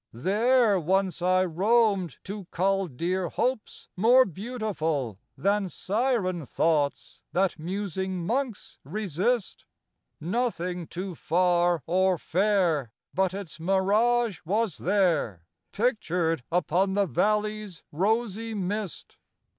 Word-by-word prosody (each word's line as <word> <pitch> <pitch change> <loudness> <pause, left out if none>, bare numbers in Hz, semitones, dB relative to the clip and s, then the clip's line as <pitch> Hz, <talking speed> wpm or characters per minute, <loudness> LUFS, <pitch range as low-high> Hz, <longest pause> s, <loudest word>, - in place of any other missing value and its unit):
There 210 - +3
once 185 +1 0
I 185 +1 +3
roamed 195 - +2
to 200 0 -6
cull 195 +2 0
Dear 175 +5 -2
hopes 255 -3 -2
more 245 +7 +6
beautiful 175 - -3 0.2
Than 200 -1 +1
siren 200 -5 -1
thoughts 150 -4 0
that 185 -2 +1
musing 190 0 -3
monks 245 +1 -3
resist; 200 - -2 0.5
Nothing 180 -3 -2
too 185 +1 -5
far 175 -1 +2
or 185 +1 +2
fair 175 - +1 0.2
But 190 -1 +1
its 195 -5 -7
mirage 205 +4 +2
was 205 0 0
there 170 - +1 0.3
Pictured 180 - 0
upon 180 +2 +1
the 200 0 +2
valley's 210 - -1
rosy 220 +5 -1
mist. 200 0 -4
190 Hz, 100 wpm, -27 LUFS, 175-215 Hz, 0.5 s, more